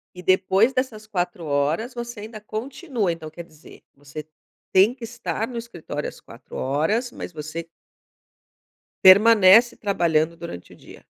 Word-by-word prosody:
E 180 - -9
depois 190 +6 +3
dessas 250 -5 -3
4 175 -4 -3
horas, 150 - -1
você 240 -3 -7
ainda 215 0 -9
continua. 230 - -3
Então, 165 -2 -7
quer 170 +2 -9
dizer, 155 -1 -17
você 145 +2 -10 0.5
tem 195 +6 +5
que 255 -3 -14
estar 225 0 -4
no 245 - -7
escritório 170 -10 -6
às - - -15
4 120 +3 -14
horas, 160 - 0
mas - - -8
você 155 +2 -6 1.4
permanece 215 +3 +7
trabalhando 170 -5 0
durante 170 - -9
o - - -15
dia. - - -15
190 Hz, 145 wpm, -23 LUFS, 160-230 Hz, 1.4 s, permanece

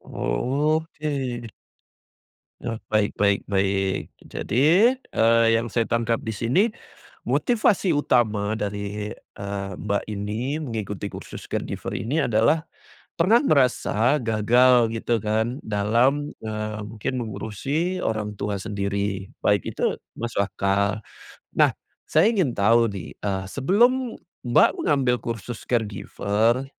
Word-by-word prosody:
Oh, 140 - 0
oke. 140 -7 -4 1.2
Nah, 115 -2 -3
baik 105 -1 0
baik 100 -1 +3
baik. 95 -1 0
Jadi, 170 - +3
eee, 115 - +2
yang 115 - -2
saya 115 0 -1
tangkap 115 -1 0
di 110 - -4
sini 120 - +2 0.6
motivasi 215 -6 +2
utama 110 -7 +1
dari, 105 0 -4
eee, 100 -1 -6
Mbak 100 0 -1
ini 110 +9 -3
mengikuti 110 - -4
kursus - - -9
caregiver - - -4
ini 145 +8 0
adalah 125 +6 +3 0.6
pernah 200 +8 +5
merasa 130 - +2
gagal 115 +2 +4
gitu 115 +1 0
kan 110 +4 0
dalam, 120 +8 +1
eee, 110 0 -4
mungkin 105 +4 -4
mengurusi 140 - -3
orang 105 -1 -2
tua 100 0 -3
sendiri, 100 -1 -3
baik 100 -3 +2
itu - - 0 0.2
masuk 115 -3 -1
akal. 100 +2 0 0.6
Nah - - +4 0.3
saya 160 +8 +4
ingin 185 - +1
tahu 115 +3 +4
nih, 95 -5 -7
eee, 95 -2 -2
sebelum 235 - +2 0.3
Mbak 120 - +5
mengambil 135 -4 +2
kursus 115 0 -6
caregiver, 110 +1 0
115 Hz, 115 wpm, -24 LUFS, 105-135 Hz, 1.2 s, pernah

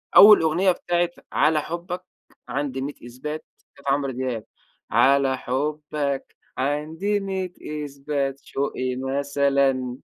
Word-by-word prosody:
أول 210 0 +10
أغنية 170 +4 +3
بتاعة 175 0 0 0.2
"على 155 0 +3
حبك 175 +3 -5 0.5
عندي 135 0 -2
مِيّة 145 +2 -3
إثبات" 150 +6 -6 0.3
بتاعة 140 -1 0
عمرو 140 -1 0
دياب، 125 -3 -3 0.5
على 135 -1 +4
حبك 145 +1 -2 0.2
عندي 155 +9 0
مِيّة 190 -2 -3 0.3
إثبات 140 -1 -2
شوقي 130 -2 -2
مثلًا 135 -1 +1
140 Hz, 105 wpm, -24 LUFS, 135-160 Hz, 0.5 s, أول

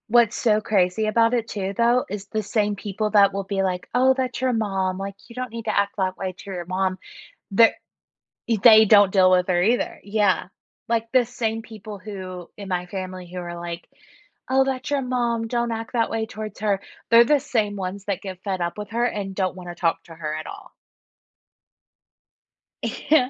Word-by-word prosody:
What's 235 -1 +4
so 215 -3 +2
crazy 195 0 +1
about 230 +2 +3
it 235 -2 0
too, 195 -2 -3
though, 240 +2 +3
is 200 0 -6
the 215 - -2
same 210 0 0
people 210 +2 -3
that 200 -2 +6
will 200 0 -2
be 195 0 -1
like, 180 -1 -2
"Oh, 260 +2 +5
that's 255 -1 -2
your 260 -1 +2
mom, 195 -4 -1
like 195 0 -5
you 235 - -12
don't 255 -2 -4
need 230 -1 -7
to 215 - -1
act 200 0 +1
that 185 -1 -1
way 190 -1 -3
to 195 +2 -10
your 175 -2 -5
mom." 185 +1 -1 0.6
Th 230 +1 +7 0.8
e 230 -2 +2
they 220 +1 +8
don't 205 -2 +6
deal 185 -2 +5
with 180 -1 +3
her 175 -1 +3
either, 230 +6 +1
yeah, 200 -4 +1 0.4
like, 230 0 -1
the 255 -2 +4
same 225 -2 -2
people 215 -2 -9
who 185 -3 -8
in 200 -2 -8
my 180 -1 -1
family 185 -1 -6
who 180 +1 -7
are 175 -1 -6
like, 170 0 -7 0.6
"Oh, 265 +1 +4
that's 265 +1 -3
your 285 -1 +1
mom, 240 -3 -1
don't 235 0 -1
act 225 +1 -5
that 230 -2 +1
way 225 0 -1
towards 215 -2 -7
her." 205 -2 +1 0.3
They're 230 +1 +8
the 295 +3 +4
same 215 -5 -1
ones 195 +1 -5
that 200 -3 -2
get 185 -2 -8
fed 190 -3 -2
up 170 +2 -2
with 210 +1 -7
her, 235 +1 0
and 200 -5 -3
don't 185 -2 -1
want 180 -1 -9
to 175 - -7
talk 165 -1 0
to 165 - -13
her 155 -2 -4
at 155 - -5
all. - - -10 2.1
Yeah. 285 -4 +2
205 Hz, 205 wpm, -23 LUFS, 185-230 Hz, 2.1 s, they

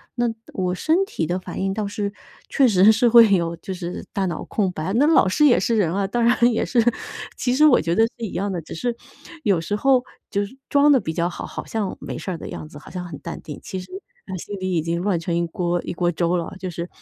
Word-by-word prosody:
那 240 0 +1 0.3
我 180 -1 -1
身 320 - +2
体 165 - -3
的 175 +3 -1
反 - - -7
应 195 0 0
倒 210 0 -2
是 200 0 -3 0.3
确 270 -3 +3
实 200 0 +6
是 235 +2 +3
会 230 -3 +8
有 170 -2 +1
就 190 - -6
是 180 -1 -6
大 195 - 0
脑 170 -3 -4
空 195 -4 0
白， 180 +3 -3
那 275 +6 +4
老 315 -11 +5
师 250 +11 +3
也 245 - +5
是 230 - +1
人 180 -6 +2
啊， 200 0 0
当 235 +4 0
然 240 +2 +4
也 225 - 0
是， 245 - +1 0.6
其 250 0 0
实 305 - +5
我 290 -5 +6
觉 170 +1 0
得 225 - +5
是 230 0 -2
一 210 - -6
样 200 +2 -1
的， 175 -3 -3
只 - - -9
是 240 +7 -2 0.5
有 195 -5 +3
时 185 +5 -2
候 255 +3 +3 0.3
就 200 - 0 0.3
装 290 +1 +5
得 270 - +6
比 160 -6 -3
较 170 +1 0
好， 175 - -7
好 - - -7
像 210 -4 -3
没 - - -6
事 - - -6
儿 170 - -4
的 - - -8
样 155 - -7
子， 150 - -12
好 145 - -13
像 180 0 -5
很 160 -5 -7
淡 - - -7
定， 150 - -8
其 190 - -5
实 180 - -10 0.4
啊 190 - -5
心 205 +4 -6
里 185 0 -2
已 165 - +2
经 170 +1 -1
乱 190 -3 +1
成 170 +1 -2
一 170 0 0
锅 175 +1 -1
一 - - -4
锅 175 0 +1
粥 170 +1 0
了， 170 +2 -4
就 185 0 -4
是 170 0 -5
190 Hz, 285 characters per minute, -22 LUFS, 175-230 Hz, 0.6 s, 会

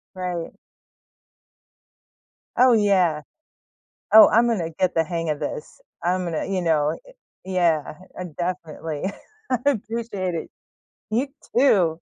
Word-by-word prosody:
Right. 180 -2 -4 2.1
Oh, 255 -1 +6
yeah. 185 -8 +3 0.9
Oh, 220 0 +10
I'm 235 +2 +4
gonna 175 -8 -1
get 185 +2 0
the 165 - +2
hang 165 0 -3
of 150 - -1
this. - - -6 0.2
I'm 180 +1 0
gonna, 165 -2 -2
you 190 -1 -1
know 155 -2 +1
eh - - -14 0.3
Yeah, 170 -6 +1 0.2
I - - -5
I - - -3
definitely. 165 -2 -5 0.5
I 255 - +2
appreciate 215 -6 -3
it. - - -5 0.6
You 245 +6 0 0.3
too. 185 - +3
180 Hz, 125 wpm, -23 LUFS, 165-215 Hz, 2.1 s, Oh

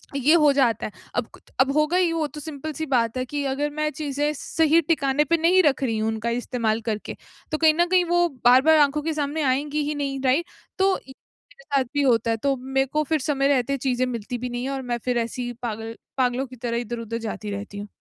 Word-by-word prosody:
ये 280 +3 +4
हो 300 -4 +6
जाता 245 -6 +2
है। - - -5 0.2
अब 245 - 0
कुत - - -18
अब 265 +1 +4
होगा 305 +3 +2
ही 360 -2 +3
वो 320 -2 0
तो 300 - -10
सिंपल 310 0 -6
-सी 315 +2 -4
बात 245 -4 +1
है 255 - 0
कि 290 +3 -3
अगर 275 +2 -1
मैं 305 0 +1
चीज़ें 295 -1 -2
सही 320 +2 +2
ठिकाने 295 -3 +1
पे 335 +3 +1
नहीं 355 +3 +4
रख 280 -3 +2
रही 225 -4 0
हूँ, 215 0 0
उनका 220 +1 -2
इस्तेमाल 235 -2 -1
करके। 220 -2 -4 0.4
तो 310 - 0
कहीं 315 0 +5
न 345 +2 +3
कहीं 365 0 +4
वो, 350 0 +3 0.2
बार-बार 260 +6 +6
आँखों 295 +1 +3
के 320 +2 -2
सामने 300 +1 -2
आएँगी 290 +3 0
ही 300 - -2
नहीं 275 -2 -2
राइट? 270 +7 +3 0.3
तो 385 0 +3
य - - -9 0.5
मेरे - - -15 0.2
साथ - - +2
भी 290 - +1
होता 230 -3 +2
है, 225 - 0
तो 275 +4 0
मेरे 270 +1 0
को 305 0 +2
फिर 310 +1 0
समय 275 -1 +1
रहते 275 0 +1
चीज़ें 255 -1 0
मिलती 245 -1 -4
भी 250 +1 -4
नहीं 245 0 -4
है 265 - -2
और 270 -1 -3
मैं 240 - +1
फिर 250 -1 +1
ऐसी 235 +1 -2
ही 245 - -4
पागल 225 -1 -5 0.2
पागलों 255 0 +1
की 255 - -12
तरह 235 -1 -3
इधर-उधर 230 -1 -4
जाती 215 -2 -5
रहती 200 0 -6
हूँ। 205 +1 -6
270 Hz, 245 wpm, -24 LUFS, 240-300 Hz, 0.5 s, हो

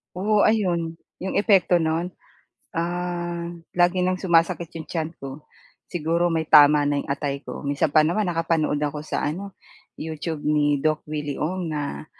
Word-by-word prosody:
Oo, 205 +3 +3
ayon, 175 -7 +1 0.2
'yong 190 - -4
epekto 195 -4 +4
no'n. 160 +2 0 0.6
Ah, 175 0 -3 0.2
lagi 180 +1 +3
ng 185 0 -1
sumasakit 170 -1 +2
'yong 160 -1 -8
tiyan 160 -2 -3
ko, 135 +2 -8 0.5
siguro 170 +1 0
may 160 -1 0
tama 150 -1 +7
na 145 0 +1
'yong - - -11
atay 140 0 -2
ko. - - -8
Minsan 140 +2 +1
pa 155 +1 +5
naman 180 +4 0
nakapanood 165 -3 0
ako 150 0 -2
sa 155 - -2
ano, 190 +6 -5 0.4
YouTube 160 0 -5
ni 145 -1 +2
Doc 155 +2 0
Willy 150 -2 -4
Ong 170 +1 -2
na 145 0 -4
165 Hz, 155 wpm, -24 LUFS, 150-175 Hz, 0.6 s, tama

